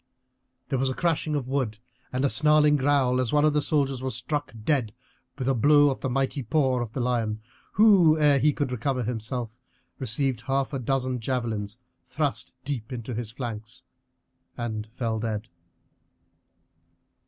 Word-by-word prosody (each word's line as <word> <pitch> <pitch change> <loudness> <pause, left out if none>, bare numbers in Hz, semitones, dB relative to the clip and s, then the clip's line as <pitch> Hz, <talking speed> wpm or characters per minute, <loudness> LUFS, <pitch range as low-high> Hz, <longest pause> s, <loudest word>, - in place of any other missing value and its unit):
There 135 - 0
was 135 0 +1
a 130 - -3
crashing 160 -2 0
of 135 -4 -2
wood 130 -5 -1 0.3
and 130 +2 0
a - - +3
snarling 150 0 +5
growl 135 -2 +2
as 125 - -1
one 150 0 +4
of 155 - +3
the 150 - +2
soldiers 140 -4 0
was 130 0 -3
struck 145 +4 -2
dead 120 -6 0 0.4
with 130 -3 -3
a 135 - +3
blow 145 +3 +5
of 135 - -5
the 130 - -1
mighty 135 +2 -1
paw 130 +1 +1
of 115 -2 -5
the - - -3
lion, 115 -3 0 0.3
who, 190 -7 +6
ere 145 -2 +4
he 150 +3 +4
could 145 -2 -2
recover 125 +1 -1
himself, 115 0 -3 0.5
received 130 -1 -1
half 135 +2 -1
a 135 - -1
dozen 130 0 -1
javelins 115 -4 -3 0.3
thrust 145 -4 -3
deep 135 -4 -4
into 120 -1 -5
his 115 -1 -4
flanks, 115 -1 -7 0.7
and 110 -3 -4
fell 115 -1 -3
dead. 110 -1 -3
130 Hz, 165 wpm, -26 LUFS, 115-145 Hz, 0.7 s, who